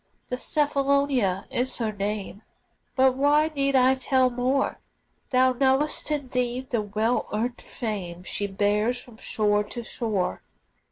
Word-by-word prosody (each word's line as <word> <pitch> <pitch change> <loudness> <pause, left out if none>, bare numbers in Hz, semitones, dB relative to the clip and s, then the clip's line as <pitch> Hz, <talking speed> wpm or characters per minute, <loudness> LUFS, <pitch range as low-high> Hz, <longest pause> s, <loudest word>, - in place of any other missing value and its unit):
The 250 - -1
Cephalonia 275 -9 +1
is 250 +2 0
her 225 -3 -1
name 205 0 -4 0.5
But 260 -1 +4
why 295 +3 +3
need 275 -1 +1
I 260 0 +5
tell 260 -1 +2
more? 255 +3 0 0.5
Thou 255 0 +4
knowest 270 +5 +1
indeed 255 -3 -2
the 235 -3 +1
well 215 +3 0
earned 240 +4 -2
fame 185 -6 -5
She 205 +2 -3
bears 210 +5 +1
from 240 -3 -13
shore 210 -2 +1
to 235 +3 -7
shore. 220 -5 -2
245 Hz, 130 wpm, -25 LUFS, 210-265 Hz, 0.5 s, I